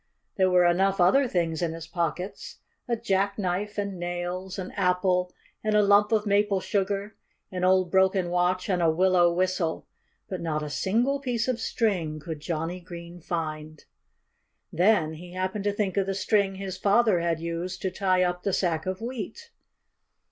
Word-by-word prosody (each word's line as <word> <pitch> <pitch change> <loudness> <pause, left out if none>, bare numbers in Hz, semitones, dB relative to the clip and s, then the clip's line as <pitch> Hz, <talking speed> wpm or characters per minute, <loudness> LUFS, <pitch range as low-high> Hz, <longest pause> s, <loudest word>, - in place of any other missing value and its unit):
There 190 -2 +3
were 180 -1 +4
enough 190 +3 +2
other 255 +10 +5
things 170 -6 -1
in 165 -2 -1
his 165 0 -7
pockets 170 +2 -4 0.3
a 240 - +1
jackknife 200 -1 -1
and 200 -3 -3
nails, 175 +2 -4
an 185 -1 -5
apple 180 -1 +1 0.3
and 215 0 +1
a 210 - +5
lump 205 +1 +4
of 215 -1 +2
maple 200 -1 +2
sugar, 200 +2 -2 0.4
an 180 -1 -3
old 185 -1 +3
broken 190 -2 +3
watch 180 +1 +1
and 185 -3 +1
a 165 - +4
willow 175 +1 +4
whistle. 180 -2 -1 0.4
But 185 - -5
not 155 -2 -2
a 150 - -5
single 240 - +1
piece 245 -4 -1
of 255 -2 0
string 185 -10 -1
could 155 0 -6
Johnnie 165 +3 -3
Green 170 0 -10
find. 155 -2 -5 0.9
Then 175 -3 +3
he 175 +3 -10
happened 185 +2 -3
to 205 - +2
think 200 -2 -2
of 195 -1 +1
the 195 - -1
string 200 0 +1
his 190 -1 -5
father 205 0 +3
had 170 -1 0
used 170 +2 -4
to 190 - 0
tie 185 -1 +2
up 180 0 -1
the 200 - -1
sack 170 -3 0
of 185 +2 -3
wheat. 255 - -6
185 Hz, 170 wpm, -26 LUFS, 175-200 Hz, 0.9 s, other